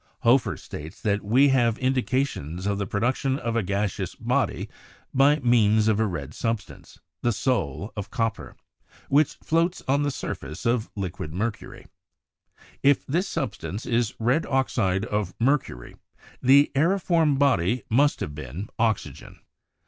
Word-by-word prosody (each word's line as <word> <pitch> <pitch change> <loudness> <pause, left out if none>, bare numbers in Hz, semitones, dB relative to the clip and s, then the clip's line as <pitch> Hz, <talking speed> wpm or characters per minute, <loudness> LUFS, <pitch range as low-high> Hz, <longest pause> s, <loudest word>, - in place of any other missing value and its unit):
Hoefer 120 +2 +3
states 80 +2 -9
that 105 -2 +1
here 100 - -11
we 135 +5 +5
have 120 -4 +2
indications 130 - -1
of 100 0 0
the 100 - -2
production 125 +6 0
of 115 -4 -3
a 115 - +2
gaseous 100 0 -2
body - - -1 0.5
by 140 +3 +5
means 110 -3 +4
of 110 -1 +2
a 110 - +2
red 75 -7 -5
substance 115 -2 -4 0.2
(the 120 - +2
soul 105 - -1
of 105 -1 -5
copper) 115 -3 -3 0.5
which 145 +1 +3
floats 170 +3 +1
on 140 +2 +2
the 145 - +1
surface 75 - -6
of 115 -1 +1
liquid 90 -5 -5
mercury; 110 +4 -4 1.0
if 140 0 +3
this 175 +8 0
substance 105 - -4
is 115 -2 0
red 125 +8 +1
oxide 110 -7 0
of 105 -5 -2
mercury, 120 - -1 0.5
the 140 +3 +5
"aeriform 165 -1 +2
body" 125 -5 +2
must 145 +6 +2
have 75 - -3
been 75 - -7
oxygen. 110 -2 -2
115 Hz, 140 wpm, -25 LUFS, 100-135 Hz, 1.0 s, we